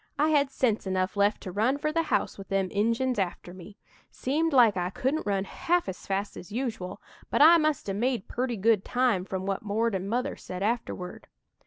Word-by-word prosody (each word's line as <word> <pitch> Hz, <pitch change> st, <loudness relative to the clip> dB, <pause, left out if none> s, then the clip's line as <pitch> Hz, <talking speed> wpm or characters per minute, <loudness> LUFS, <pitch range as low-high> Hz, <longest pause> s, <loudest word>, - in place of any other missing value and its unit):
I 300 Hz, +2 st, +3 dB
had 290 Hz, -3 st, +3 dB
sense 230 Hz, -7 st, 0 dB
enough 185 Hz, +1 st, -1 dB
left 205 Hz, +1 st, +2 dB
to 185 Hz, -, -5 dB
run 225 Hz, +9 st, +1 dB
for 305 Hz, +1 st, -1 dB
the 330 Hz, +1 st, +1 dB
house 330 Hz, -, -1 dB
with 195 Hz, -, -10 dB
them 195 Hz, -1 st, 0 dB
Injuns 230 Hz, +4 st, +1 dB
after 175 Hz, -1 st, -3 dB
me. 185 Hz, +2 st, -12 dB, 0.3 s
Seemed 315 Hz, +5 st, -1 dB
like 240 Hz, -7 st, +6 dB
I 180 Hz, -1 st, -1 dB
couldn't 265 Hz, +7 st, -2 dB
run 195 Hz, -1 st, +1 dB
half 345 Hz, -, 0 dB
as 185 Hz, -, -7 dB
fast 200 Hz, +1 st, -2 dB
as 180 Hz, -, -10 dB
usual, 225 Hz, -6 st, -4 dB, 0.3 s
but -, -, 0 dB
I 330 Hz, +3 st, +8 dB
must 310 Hz, -6 st, 0 dB
'a' 195 Hz, -, -1 dB
made 235 Hz, +1 st, -1 dB
purty 245 Hz, -1 st, -2 dB
good 210 Hz, 0 st, +3 dB
time, 245 Hz, -7 st, +1 dB
from 190 Hz, -1 st, -4 dB
what 195 Hz, -1 st, -2 dB
'Mord' 220 Hz, +2 st, 0 dB
an' 190 Hz, 0 st, -2 dB
Mother 245 Hz, +3 st, -1 dB
said 185 Hz, +1 st, -6 dB
afterward. 210 Hz, -5 st, -3 dB
215 Hz, 205 wpm, -27 LUFS, 195-260 Hz, 0.3 s, I